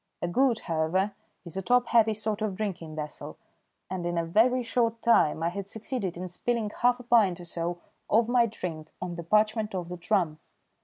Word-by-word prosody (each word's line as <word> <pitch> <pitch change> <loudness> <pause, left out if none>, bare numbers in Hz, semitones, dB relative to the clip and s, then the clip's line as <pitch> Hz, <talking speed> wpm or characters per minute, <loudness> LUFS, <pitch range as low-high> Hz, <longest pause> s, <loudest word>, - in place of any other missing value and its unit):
A - - -2
gourd, 240 +4 +2
however, 170 +5 0 0.3
is 170 - -8
a - - 0
top 245 +5 +3
heavy 225 -2 +4
sort 215 0 -3
of 210 -3 -1
drinking 180 -6 -4
vessel, 150 -1 -6 0.5
and 185 -1 -4
in 175 0 -2
a 170 - +1
very 240 +8 +3
short 230 -1 0
time 165 -9 +4
I 170 - +2
had 195 +2 -5
succeeded 210 -4 -4
in 180 +1 -4
spilling 220 +4 -2
half 245 +2 +2
a - - -9
pint 220 -7 +3
or 175 - -9
so 170 +1 -3 0.3
of 225 +1 +4
my 240 -1 +4
drink 165 -7 -6
on 180 -1 -4
the 170 - -5
parchment 215 +3 +2
of 175 -2 -4
the 180 - -5
drum. 170 -4 0
200 Hz, 200 wpm, -28 LUFS, 170-230 Hz, 0.5 s, heavy